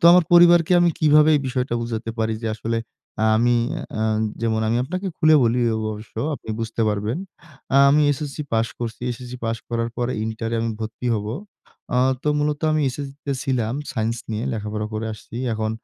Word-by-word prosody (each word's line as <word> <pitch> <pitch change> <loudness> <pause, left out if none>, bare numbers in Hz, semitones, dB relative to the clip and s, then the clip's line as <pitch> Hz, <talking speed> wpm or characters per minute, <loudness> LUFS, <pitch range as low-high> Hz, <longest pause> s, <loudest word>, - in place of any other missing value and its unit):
তো - - -2
আমার 180 -2 +6
পরিবারকে 175 0 +7
আমি 175 -1 +4
কিভাবে 150 0 +5
এই - - 0
বিষয়টা 125 -1 -1
বুঝাতে 115 -1 -4
পারি? 110 0 0
যে, - - -2
আসলে 115 +1 -2 0.6
আমি 120 +2 +3 0.2
এ্যা 110 - -6 0.4
যেমন 110 -1 +1
আমি 115 - +1
আপনাকে 185 +6 -4
খুলে 155 0 +5
বলি 120 +1 +2 0.3
অবশ্য 105 +1 -10 0.2
আপনি - - -13
বুঝতে 115 0 -2
পারবেন। 105 +7 -1 0.5
এ্যা 135 - +5
আমি 150 +1 +4
এসএসসি 150 +1 -5
পাস 115 0 +2
করছি। 115 -2 -5
এসএসসি 125 +1 -7
পাস 115 0 0
করার 115 -1 -1
পর 120 -1 0 0.2
ইন্টার 110 0 -3
এ - - +1
আমি 115 0 -1
ভর্তি 110 +3 -5
হব। 105 -1 -3 0.7
এ্যা 125 - +3 0.2
তো - - 0
মূলত 150 0 0
আমি 155 0 +2
এসএসসি 135 +1 -6
তে 140 - 0
ছিলাম 125 -3 -1 0.2
সাইন্স 115 -1 -1
নিয়ে 110 +2 -2
লেখাপড়া 105 -1 -3
করে 110 +1 -2
আসছি। 110 +2 -11 0.2
এখন 110 0 -1
120 Hz, 185 wpm, -22 LUFS, 110-145 Hz, 0.7 s, পরিবারকে